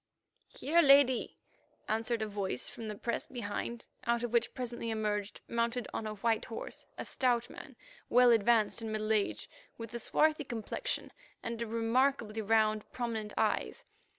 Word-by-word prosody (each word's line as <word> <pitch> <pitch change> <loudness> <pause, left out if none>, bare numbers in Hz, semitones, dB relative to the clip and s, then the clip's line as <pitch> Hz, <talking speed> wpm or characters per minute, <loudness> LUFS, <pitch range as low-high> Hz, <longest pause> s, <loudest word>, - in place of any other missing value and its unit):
"Here, 335 +4 +2
Lady," 275 -4 +5 0.5
answered 225 +1 0
a - - -2
voice 200 -10 -2
from 225 - -7
the 210 - -4
press 235 +2 -2
behind, 235 0 -4 0.2
out 235 0 +2
of 240 -1 -3
which 235 0 +2
presently 240 -3 -4
emerged, 210 -2 -2
mounted 235 +1 -1
on 220 - -3
a 215 - -4
white 225 +1 0
horse, 225 - -6
a - - -4
stout 245 -2 +1
man, - - -10 0.3
well 245 0 +6
advanced 225 0 +3
in 220 -1 -4
middle 215 0 0
age, 210 -2 0 0.3
with 230 -1 -8
a 235 - -3
swarthy 305 +6 +2
complexion 240 - -3 0.3
and 230 0 -4
remarkably 230 0 +1
round, 215 0 +2
prominent 225 -4 -3
eyes. - - 0
230 Hz, 150 wpm, -32 LUFS, 215-240 Hz, 0.5 s, well